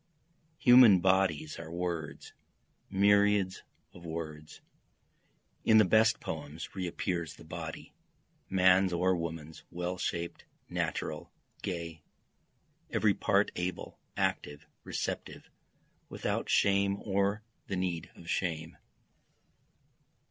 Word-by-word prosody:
Human 125 -6 +8
bodies 95 -5 +1
are - - -8
words, 85 -3 -4 0.6
myriads 100 -1 +3 0.3
of 85 - -13
words, 80 -2 -7 1.0
(In 110 - +5
the 110 - +7
best 110 +4 +4
poems 80 +1 -6
re 95 -2 -3
appears 85 -1 -3
the - - -14
body, 80 0 -7 0.6
man's 95 0 +4
or 90 +2 +2
woman's, 80 -2 -6
well 90 +1 -4
shaped, 85 0 -3 0.2
natural, - - -3 0.3
gay, 85 -3 -5 0.9
Every - - +2
part - - +2
able, 90 0 -4 0.2
active, 75 +2 -2 0.2
receptive, - - -5 0.6
without - - -3
shame 100 0 +3
or 100 +1 0 0.2
the 100 - -2
need 85 -3 -2
of 85 - -14
shame.) 80 -2 -2
90 Hz, 100 wpm, -31 LUFS, 80-95 Hz, 1.0 s, Human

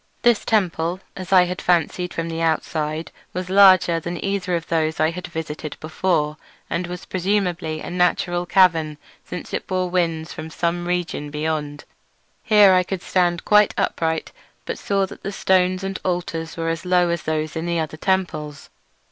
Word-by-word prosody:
This 240 -3 +4
temple, 180 -4 0 0.2
as 185 -1 -7
I 185 -2 +7
had 180 +1 -4
fancied 180 +1 +1
from 165 0 -3
the 165 0 -4
outside, 160 -1 -1 0.2
was 185 +1 -4
larger 185 -4 +6
than 170 +2 -5
either 195 -2 -1
of 165 -1 -3
those 160 -1 0
I 155 +1 +3
had 180 +2 -6
visited 155 -2 -6
before; 155 -2 0 0.3
and 175 +1 -1
was 180 +1 -7
presumably 180 -4 -1
a - - -6
natural 175 0 +1
cavern, 165 -5 +3 0.3
since 180 - -8
it - - -3
bore 185 -1 -1
winds 165 -2 -1
from 155 0 -7
some 175 +2 -2
region 175 -4 -2
beyond. 150 -1 -3 0.6
Here 210 -3 +6
I 185 - +5
could 180 0 -4
stand 175 -2 +1
quite 210 -1 +5
upright, 160 -1 -1 0.3
but - - -4
saw 195 -1 +1
that - - -12
the 200 - -4
stones 185 -1 +2
and 195 0 -3
altars 170 -3 -3
were 165 0 -1
as 165 -1 -3
low 180 -1 +3
as 170 0 -1
those 155 0 -2
in 160 +1 -3
the 170 -1 0
other 155 -1 -3
temples. 155 -6 -2
175 Hz, 175 wpm, -22 LUFS, 160-185 Hz, 0.6 s, I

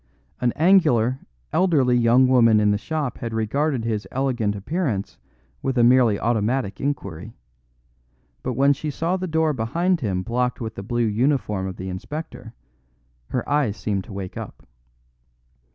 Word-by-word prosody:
An 125 -1 +1
angular, 150 - +3 0.3
elderly 150 -9 +3
young 120 +2 +4
woman 115 -4 +5
in 105 -1 +3
the 105 - +1
shop 150 -1 -3
had 115 -2 -4
regarded 125 +3 0
his 110 -2 -2
elegant 125 -6 -1
appearance 110 - -3 0.4
with 135 -1 -2
a 120 - +5
merely 120 -4 +4
automatic 115 -1 -1
inquiry; 110 - -4 1.1
but 130 - -3
when 140 +4 +4
she 150 +2 -5
saw 165 +5 -1
the 185 0 -3
door 160 -1 +1
behind 165 +10 0
him 95 -5 -1
blocked 125 +2 -1
with 110 -1 -5
the - - -7
blue 120 +3 -1
uniform 110 -4 0
of 95 - -7
the 95 - -6
inspector, 115 - -7 0.7
her 125 - -3
eyes 140 -8 +1
seemed 100 -3 -2
to 120 - -12
wake 95 -2 -6
up. - - -9
120 Hz, 150 wpm, -23 LUFS, 110-140 Hz, 1.1 s, woman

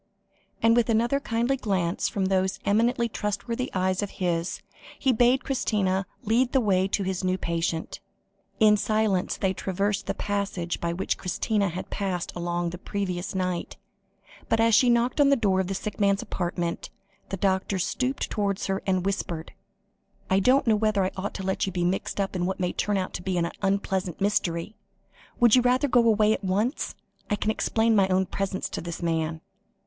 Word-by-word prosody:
And 230 0 +5
with 240 0 +2
another 235 +5 +2
kindly 240 0 0
glance 190 -8 0
from 195 -2 -1
those 190 0 +1
eminently 235 +3 +2
trustworthy 230 +4 -3
eyes 185 0 +1
of 205 - -2
his, 175 -1 -1 0.3
he 265 -2 +2
bade 245 +3 +3
Christina 195 -8 0 0.2
lead 240 +3 +2
the 265 - +5
way 190 -5 +2
to 195 0 -1
his 190 0 -2
new 185 0 +1
patient. 165 -2 -2 0.6
In 210 -2 +6
silence 215 -3 0
they 190 -1 0
traversed 200 +2 -2
the - - -1
passage 200 -4 -2
by 170 - 0
which 175 +3 -2
Christina 200 +2 0
had 175 +2 -6
passed 185 -4 -2
along 175 0 -2
on 170 - -1
the 180 - -8
previous 190 -1 -3
night, 180 -2 -2 0.7
but 225 - +2
as 225 0 +4
she 245 +3 +6
knocked 240 +4 +2
on 280 - +5
the 280 - +5
door 200 -6 +1
of 190 - 0
the 195 - -2
sick 215 +3 -5
man's 200 -1 +2
apartment, 175 -1 -3 0.4
the 195 - -3
doctor 190 +1 0
stooped 255 +8 -1
towards 200 -2 -1
her 195 0 -1
and 185 -1 +1
whispered: 175 -4 -3 0.8
"I 190 - +5
don't 260 +7 +4
know 225 -3 +4
whether 210 -2 +1
I 185 - -1
ought 195 +2 -4
to 190 - -5
let 190 +1 -1
you - - -2
be 175 -1 -1
mixed 185 +3 -1
up 195 -1 -1
in 180 -1 0
what 190 - -3
may 180 -1 -1
turn 205 -1 0
out 185 -1 -3
an 175 -2 -1
unpleasant 195 -2 -1
mystery. 195 -1 0 0.6
Would 240 -1 +6
you 250 - +5
rather 250 +3 +2
go 245 -3 +4
away 215 -1 +4
at - - -4
once? 205 +8 -1 0.3
I 205 - +2
can 210 +1 0
explain 225 +1 +1
my 195 -2 +4
own 190 0 +2
presence 190 +1 -3
to - - -4
this 170 +1 -6
man." 160 -1 -1
195 Hz, 185 wpm, -26 LUFS, 185-220 Hz, 0.8 s, In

